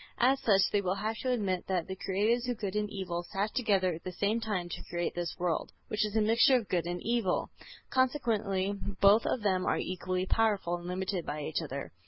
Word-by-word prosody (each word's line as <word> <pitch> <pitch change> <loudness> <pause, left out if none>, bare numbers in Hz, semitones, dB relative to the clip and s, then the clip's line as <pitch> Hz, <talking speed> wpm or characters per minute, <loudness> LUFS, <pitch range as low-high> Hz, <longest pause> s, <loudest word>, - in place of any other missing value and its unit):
As 265 +3 +4
such 195 -6 +4
they 205 - +2
will 185 -1 0
have 215 +3 -2
to 255 - -2
admit 200 -7 0
that 185 -3 0
the 190 - -4
Creators 215 +6 0
of 245 - -1
good 205 -2 -4
and 210 0 0
evil 180 -4 -3
sat 200 +4 -3
together 195 -7 +2
at 165 - -8
the 185 - -4
same 205 +5 0
time 210 -6 -2
to 175 - -6
create 175 0 -2
this 175 -2 -3
world, 175 -3 -1 0.2
which 215 - +1
is 210 0 -3
a 220 - +4
mixture 225 +5 +5
of 235 -5 0
good 175 -2 0
and 175 0 -3
evil. 230 -5 0 0.4
Consequently, 220 -7 +1 0.3
both 205 +3 +6
of 240 - -1
them 185 -3 +2
are - - +2
equally 185 0 -2
powerful, 200 -5 +1
and 175 0 -9
limited 185 0 -2
by 150 0 -4
each 155 +3 -2
other. 140 -3 -5
195 Hz, 220 wpm, -31 LUFS, 180-220 Hz, 0.4 s, both